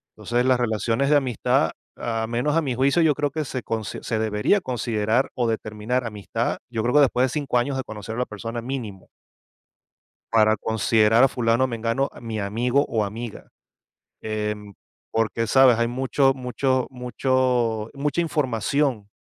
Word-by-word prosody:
Entonces, 120 +1 -1
las 130 -1 +3
relaciones 120 +4 0
de 150 - +7
amistad, 130 -6 +1 0.3
a 115 -1 -2
menos 120 +7 0
a 165 - +3
mi 135 -4 -2
juicio, 140 +6 +3
yo 155 -2 +4
creo 145 0 0
que 155 -1 -3
se 130 -2 -4
consi 110 -2 -4
se 110 - -2
debería 110 - +2
considerar, 115 -2 0
o 120 -2 0
determinar 110 +2 -2
amistad, 105 -3 -3
yo 115 -2 -2
creo, 125 +4 0
que 150 - +7
después 130 -2 +3
de - - -2
5 140 -2 -1
años, 135 +3 -1
de 130 - -2
conocer 110 0 -7
a - - -4
la 125 - +1
persona, 115 +2 -6
mínimo. 115 -7 -6 1.2
Para 110 -1 +4
considerar 110 +2 +3
a - - +5
fulano 120 0 +1
o - - +3
mengano, 115 +2 -1
mi 115 -2 -5
amigo 120 +7 +1
o 110 -2 0
amiga, 110 +2 -7 0.7
em, 105 -1 -4 0.4
porque, 115 +1 0
¿sabes?, 130 -1 +6
hay 115 - +2
mucho 135 +2 +2
mucho 130 0 0
mucho 125 -3 0
mucha 145 +3 0
información, 130 -6 0
120 Hz, 165 wpm, -23 LUFS, 110-130 Hz, 1.2 s, de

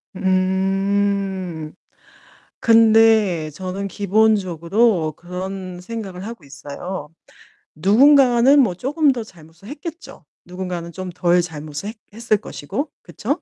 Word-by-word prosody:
음. 190 -2 0 0.9
근데 220 -7 +4
저는 185 +5 -5
기본적으로 200 -3 +1
그런 185 +1 -7
생각을 195 -2 -7
하고 230 -6 -8
있어요. 145 +4 -7 0.7
누군가는 255 - +5
뭐 200 -9 +1
쪼금 285 - +1
더 245 -3 -4
잘못을 170 -1 -17
했겠죠. 320 - -9 0.2
누군가는 180 -1 -6
좀 185 +1 -6
덜 175 0 +2
잘못을 155 +2 -6
했 220 - -8 0.2
했을 225 -1 0
것이고. 210 - -5
그쵸? 285 - -3
195 Hz, 230 characters per minute, -20 LUFS, 175-225 Hz, 0.9 s, 누군가는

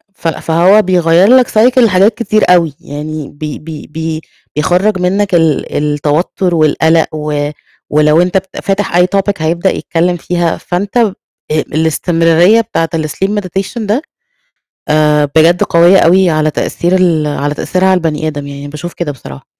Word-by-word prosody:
ف 170 - -5
فهو 170 +5 +2
بيغيّر 180 -1 +2
لك 250 -2 +3
cycle 240 +4 +2
لحاجات 205 -2 +3
كتير 215 -2 0
أوي، 170 -4 +3
يعني 150 0 -7
بي 150 0 -7
بي 155 -1 -9
بي 160 +1 -5 0.3
بيخرّج 185 +6 +1
منك 190 +1 0
ال 165 -3 0
التوتر 150 +5 -1
والقلق 160 +1 +2
و 150 -1 -2 0.4
ولو 150 +2 +3
أنت 180 +1 +1
بت 190 0 -6
فاتح 195 -2 -1
أي 180 +1 +4
topic 195 -3 -1
هيبدأ 170 +4 0
يتكلم 175 0 -1
فيها، 175 0 -2
فانت 195 +5 -3
آآ 225 -5 +2 0.4
الاستمرارية 165 +5 +2
بتاعة 185 -7 -2
الSleep 160 +5 -2
Meditation 195 +4 -5
ده 215 +6 -1 0.9
آآ 150 -1 +3
بجد 165 +2 +4
قوية 170 +3 +4
أوي 185 +1 +4
على 155 -1 0
تأثير 175 +4 -1
ال 170 -5 +1
على 145 0 -2
تأثيرها 185 +5 -1
على 190 - +3
البني 155 -2 -2
آدم، 145 -2 -5
يعني 140 0 -8
باشوف 150 +4 -7
كده 170 -4 -4
بصراحة. 70 - -11
170 Hz, 155 wpm, -12 LUFS, 155-185 Hz, 0.9 s, أي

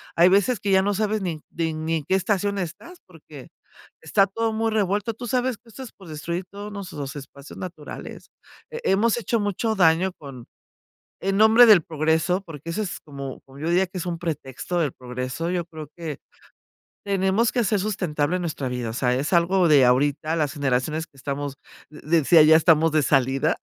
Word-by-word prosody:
Hay 170 +1 +6
veces 200 +4 +2
que 200 0 -2
ya 190 0 +5
no 205 +1 0
sabes 215 +1 -1
ni 170 -5 -4
ni 165 -1 -2
ni 160 +1 -2
en 155 - -5
qué 190 - +2
estación 200 +1 0
estás, 195 - -6
porque - - -14 0.5
está 195 -2 +2
todo 225 +3 -2
muy 225 +1 0
revuelto, 210 +1 0
¿tú 245 +3 -8
sabes 250 0 0
que 230 +2 -22
esto 265 +4 -9
es 250 - -10
por 190 - -16
destruir 170 +4 -4
todos 205 +1 -8
nuestros 155 -8 -6
espacios 140 0 -11
naturales? 170 -5 -9 0.4
He 470 0 -2
hemos 220 +4 +2
hecho 235 0 -1
mucho 205 +2 -1
daño 175 0 +3
con 130 -5 -10 0.8
en 195 +1 0
nombre 220 +3 +7
del 200 -7 +7
progreso, 160 +3 0
porque 165 -4 -10
eso 210 - -2
es 195 - -5
como 140 -3 -8
como, 135 +1 -16
yo 155 - -3
diría 185 +2 +2
que 185 - -8
es 175 - -4
un 170 -1 -3
pretexto 160 +1 -4
del 150 -6 0
progreso. 125 +6 -5
Yo 175 -2 -1
creo 155 -3 -10
que, 160 -4 -6 0.9
tenemos 200 +3 +1
que - - -3
hacer 210 -2 +1
sustentable 180 -5 -1
nuestra 155 -6 -3
vida, 125 -2 -3
o - - -5
sea, 125 0 +1
es 140 +6 -2
algo 175 +1 +3
de 145 -4 +6
ahorita 145 +5 +1
las 150 -4 -1
generaciones 145 +3 -1
que 140 - -24
estamos, 140 +1 -4 0.3
de 150 - -13 0.2
decía, 160 +2 +6
ya 155 +1 +7
estamos 160 -1 +4
de 155 -1 +3
salida, 135 +2 +1
170 Hz, 195 wpm, -23 LUFS, 150-200 Hz, 0.9 s, nombre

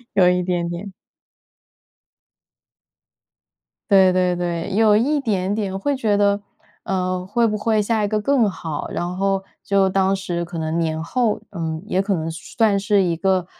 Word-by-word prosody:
有 185 -2 +5
一 180 0 +3
点 175 -1 -1
点。 175 +3 -6 3.0
对 190 -2 +6
对 180 -1 +2
对， 175 +1 -3
有 215 0 +4
一 285 +7 +2
点 200 -6 -1
点 195 -3 -2
会 280 +7 -1
觉 215 -5 +1
得 200 0 +2 0.4
呃 185 -1 -2
会 230 +5 +1
不 215 -1 -1
会 215 0 +1
下 215 0 0
一 - - -1
个 215 0 -1
更 250 -4 +2
好。 160 -5 -5
然 175 +1 -3
后 195 0 0 0.2
就 195 -1 +2
当 190 0 +2
时 175 -2 -3
可 170 - -7
能 160 +1 -2
年 160 -1 -1
后， 230 +1 0
嗯 160 -3 -4
也 190 -3 0
可 195 -1 0
能 160 0 -3
算 200 +5 0
是 200 -1 +2
一 170 -2 0
个 190 -1 +1
195 Hz, 175 characters per minute, -21 LUFS, 180-210 Hz, 3.0 s, 对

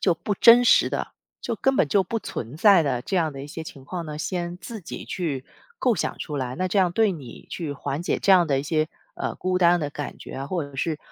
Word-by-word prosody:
就 180 - +3
不 205 +5 -3
真 235 +4 +8
实 - - +5
的， - - -2 0.3
就 230 -2 -3
根 270 +5 +2
本 150 - +3
就 195 +6 +3
不 225 +5 -3
存 120 - -6
在 195 -3 +6
的 130 -5 -1
这 185 +9 -3
样 160 -3 +1
的 135 0 -7
一 - - -7
些 160 +2 -7
情 140 -3 -10
况 175 +2 -5
呢， 150 -1 -6
先 175 +1 -3
自 220 +3 -8
己 - - -7
去 145 -8 -3 0.3
构 250 -3 +2
想 - - -2
出 150 -2 -5
来， 130 -2 -3
那 185 +1 -1
这 200 - +1
样 180 -2 +3
对 215 -1 +3
你 140 -8 -10
去 160 -5 -4
缓 140 +2 -4
解 175 - 0
这 200 - +1
样 180 -2 +6
的 140 -3 +1
一 - - -6
些， 155 +1 0 0.3
呃， - - -3
孤 185 0 -1
单 175 -1 +4
的 145 - -2
感 145 0 -6
觉 - - -10
啊， 135 - -4
或 170 +1 -2
者 140 -1 -9
是， 155 +2 -1
170 Hz, 280 characters per minute, -24 LUFS, 145-185 Hz, 0.3 s, 真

